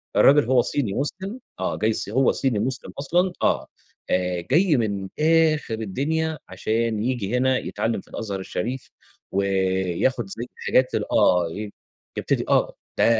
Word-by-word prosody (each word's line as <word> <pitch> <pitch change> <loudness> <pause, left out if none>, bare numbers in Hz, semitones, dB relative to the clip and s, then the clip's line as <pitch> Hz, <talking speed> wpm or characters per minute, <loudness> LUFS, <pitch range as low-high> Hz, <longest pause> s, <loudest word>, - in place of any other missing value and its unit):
الراجل 145 -2 +6
هو 125 0 +4
صيني 115 -8 -1
مسلم 190 - -3 0.2
آه، - - -1
جاي 110 +1 +1
الصي 105 -2 -2
هو 130 +3 +4
صيني 125 -6 0
مسلم 125 +2 -3
أصلًا 175 +5 +1
آه، - - +2 0.4
آآ، 90 -1 0
جاي 165 -2 +4
من 100 -4 -1
آخر 155 -5 +3
الدنيا 150 +9 -1
عشان 110 -1 -1
ييجي 120 -2 -1
هنا 130 0 +3
يتعلّم 115 +1 -2
في - - -19
الأزهر 100 -3 -4
الشريف، 120 +7 -4 0.4
وياخد 95 +3 +1
زي 120 +4 -5 0.2
حاجات 130 0 +3
ال - - -2
آه، 90 -2 +4
ي 105 +2 -6 0.5
يبتدي - - 0
آه، - - +2 0.2
ده - - +4
120 Hz, 150 wpm, -24 LUFS, 100-140 Hz, 0.5 s, الراجل